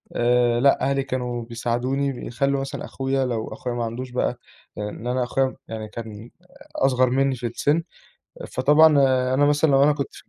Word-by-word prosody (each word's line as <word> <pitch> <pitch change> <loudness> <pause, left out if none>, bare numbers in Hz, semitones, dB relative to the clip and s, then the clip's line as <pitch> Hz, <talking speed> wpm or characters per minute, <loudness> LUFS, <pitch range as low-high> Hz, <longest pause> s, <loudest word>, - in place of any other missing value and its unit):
آآ 120 0 +2
لأ 140 +2 +4
أهلي 135 0 +1
كانوا 125 -2 -3
بيساعدوني 120 +4 -1
بيخلّوا 135 +3 -1
مثلًا 135 - -5
أخويا 135 0 -1
لو 115 -3 -3
أخويا 125 -1 -5
ما 120 - -2
عندوش 125 +3 -6
بقى، 125 - -1 0.4
لإن 105 +3 -5
أنا 125 +1 0
أخويا 135 +2 +1
م 130 - -5
يعني 110 -1 -6
كان 110 0 -9 0.5
أصغر 130 -1 +2
منّي 135 +1 +1
في 120 0 -4
السِن، 145 +7 0 0.7
فطبعًا 150 +5 +5 0.5
أنا 145 +2 +3
مثلًا 150 +1 +3
لو 135 0 +4
أنا 150 +1 +5
كنت 140 -2 -5
في - - -15
130 Hz, 175 wpm, -23 LUFS, 120-135 Hz, 0.7 s, فطبعًا